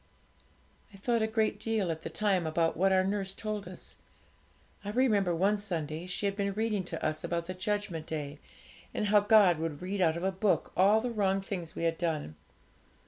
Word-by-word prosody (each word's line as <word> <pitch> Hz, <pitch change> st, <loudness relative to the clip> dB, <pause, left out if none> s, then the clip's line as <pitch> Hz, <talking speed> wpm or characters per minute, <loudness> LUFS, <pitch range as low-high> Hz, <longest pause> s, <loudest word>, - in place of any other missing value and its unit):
'I 195 Hz, -, -13 dB
thought 230 Hz, +3 st, 0 dB
a 220 Hz, -, +2 dB
great 220 Hz, -2 st, 0 dB
deal 215 Hz, -5 st, 0 dB
at 160 Hz, 0 st, -5 dB
the -, -, -5 dB
time 195 Hz, -6 st, +1 dB
about 165 Hz, +1 st, +1 dB
what 190 Hz, +3 st, +3 dB
our 190 Hz, 0 st, +4 dB
nurse 195 Hz, 0 st, -2 dB
told 215 Hz, -2 st, -4 dB
us. -, -, -9 dB, 0.9 s
I 205 Hz, -, -5 dB
remember 210 Hz, -7 st, +2 dB
one 200 Hz, +5 st, +2 dB
Sunday 170 Hz, -4 st, -4 dB
she 185 Hz, +2 st, -3 dB
had 200 Hz, 0 st, 0 dB
been 200 Hz, -1 st, -1 dB
reading 215 Hz, -2 st, 0 dB
to 165 Hz, -2 st, -5 dB
us 155 Hz, 0 st, -1 dB
about 170 Hz, -1 st, -2 dB
the 185 Hz, -, -5 dB
Judgment 190 Hz, -4 st, -3 dB
Day, 150 Hz, -2 st, -4 dB, 0.6 s
and -, -, 0 dB
how 210 Hz, 0 st, +6 dB
God 205 Hz, -5 st, +5 dB
would 160 Hz, -3 st, -3 dB
read 190 Hz, +1 st, -2 dB
out 165 Hz, -2 st, +3 dB
of 170 Hz, -, -5 dB
a 190 Hz, -, +1 dB
book 190 Hz, +1 st, 0 dB
all 205 Hz, +4 st, +5 dB
the 245 Hz, +1 st, -2 dB
wrong 195 Hz, -3 st, +1 dB
things 190 Hz, -4 st, -5 dB
we -, -, -4 dB
had 165 Hz, -1 st, 0 dB
done. 155 Hz, -, -2 dB
195 Hz, 200 wpm, -30 LUFS, 170-210 Hz, 0.9 s, how